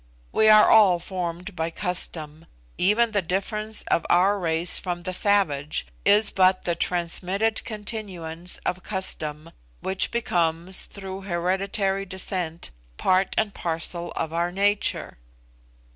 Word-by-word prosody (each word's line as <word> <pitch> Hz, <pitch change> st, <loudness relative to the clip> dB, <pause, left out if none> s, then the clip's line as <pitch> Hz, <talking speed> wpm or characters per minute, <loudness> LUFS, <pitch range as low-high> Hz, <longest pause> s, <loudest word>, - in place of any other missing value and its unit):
We 220 Hz, -, +4 dB
are 215 Hz, 0 st, +8 dB
all 205 Hz, -5 st, +6 dB
formed 180 Hz, +1 st, -5 dB
by 165 Hz, -1 st, -1 dB
custom 165 Hz, -3 st, -3 dB, 0.3 s
even 215 Hz, +5 st, +3 dB
the 205 Hz, -2 st, +1 dB
difference 210 Hz, +5 st, -2 dB
of 170 Hz, -, +1 dB
our 195 Hz, +4 st, +4 dB
race 165 Hz, 0 st, +1 dB
from 175 Hz, -2 st, -4 dB
the 185 Hz, +1 st, -4 dB
savage 165 Hz, -8 st, +1 dB, 0.2 s
is 205 Hz, +1 st, +5 dB
but 185 Hz, 0 st, +3 dB
the 175 Hz, -, +1 dB
transmitted 180 Hz, +6 st, 0 dB
continuance 185 Hz, -6 st, -4 dB
of 185 Hz, -, -1 dB
custom, 160 Hz, -5 st, -3 dB, 0.3 s
which 190 Hz, 0 st, -1 dB
becomes, 175 Hz, -5 st, 0 dB
through 195 Hz, -1 st, -8 dB
hereditary 195 Hz, +2 st, -1 dB
descent, 180 Hz, -, -4 dB, 0.3 s
part 185 Hz, +1 st, +2 dB
and 215 Hz, -2 st, +1 dB
parcel 170 Hz, +1 st, -3 dB
of 160 Hz, -1 st, -3 dB
our 170 Hz, +1 st, 0 dB
nature. 200 Hz, -, 0 dB
185 Hz, 125 wpm, -24 LUFS, 170-200 Hz, 0.3 s, are